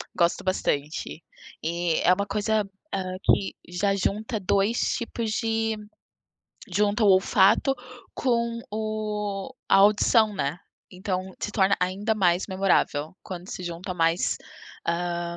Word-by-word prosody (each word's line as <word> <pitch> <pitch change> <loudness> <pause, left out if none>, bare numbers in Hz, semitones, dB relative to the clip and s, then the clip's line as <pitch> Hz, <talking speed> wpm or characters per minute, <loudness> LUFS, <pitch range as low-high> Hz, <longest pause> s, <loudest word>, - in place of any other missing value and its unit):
gosto 170 +3 +2
bastante. 155 -4 -2 0.4
E 170 0 0
é - - +5
uma 200 +2 -1
coisa, 210 +1 +1 0.3
hã, 185 -1 -2
que 195 - +2
já 195 +3 +1
junta 210 +3 -1
2 200 +4 +1 0.2
tipos 235 -2 -3
de 225 0 0 1.0
junta 210 +4 +2
o - - +5
olfato 195 +6 +4 0.4
com 235 -2 0
o 215 0 -3
a - - +6
audição, 210 +2 +5
né. 150 -2 -2 0.3
Então 185 0 -4
se - - -2
torna 195 -1 +3
ainda 195 +5 0
mais 180 -3 +2
memorável, 185 -4 +1
quando 180 -1 -8
se 180 - -6
junta 175 +2 -5
mais, 165 0 +1 0.5
ah, 170 0 -2
195 Hz, 125 wpm, -26 LUFS, 180-215 Hz, 1.0 s, a